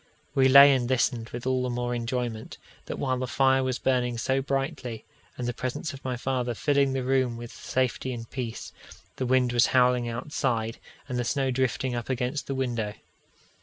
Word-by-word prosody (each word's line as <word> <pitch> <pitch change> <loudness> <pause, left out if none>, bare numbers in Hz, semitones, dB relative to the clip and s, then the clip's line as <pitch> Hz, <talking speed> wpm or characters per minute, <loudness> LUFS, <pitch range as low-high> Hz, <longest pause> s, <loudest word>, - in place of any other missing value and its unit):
We 135 -2 +4
lay 140 +1 +9
and 125 -2 0
listened 120 -3 +1
with 120 +1 -7
all 130 0 +1
the 125 - -1
more 120 0 -2
enjoyment, 120 -1 -3 0.3
that - - -4
while 130 -2 -1
the 130 - -2
fire 135 +1 +3
was 130 -1 -1
burning 125 -2 0
so 130 +3 0
brightly, 135 -3 -3 0.3
and 125 - -3
the 120 - -1
presence 130 +6 -4
of 135 - -11
my 125 -1 -2
father 125 -1 -1
filling 140 +1 +2
the 135 -1 -1
room 130 -2 +1
with 120 0 -8
safety 130 0 -2
and 115 -2 -6
peace, 120 -3 -6 0.4
the 130 - -1
wind 125 -1 +3
was 120 0 +5
howling 125 -1 +3
outside, 115 -2 -2 0.3
and 125 -3 -2
the - - 0
snow 135 +2 0
drifting 130 0 0
up 120 +1 -4
against 130 +3 -2
the 135 - -2
window. 120 -5 -2
125 Hz, 190 wpm, -27 LUFS, 120-130 Hz, 0.4 s, lay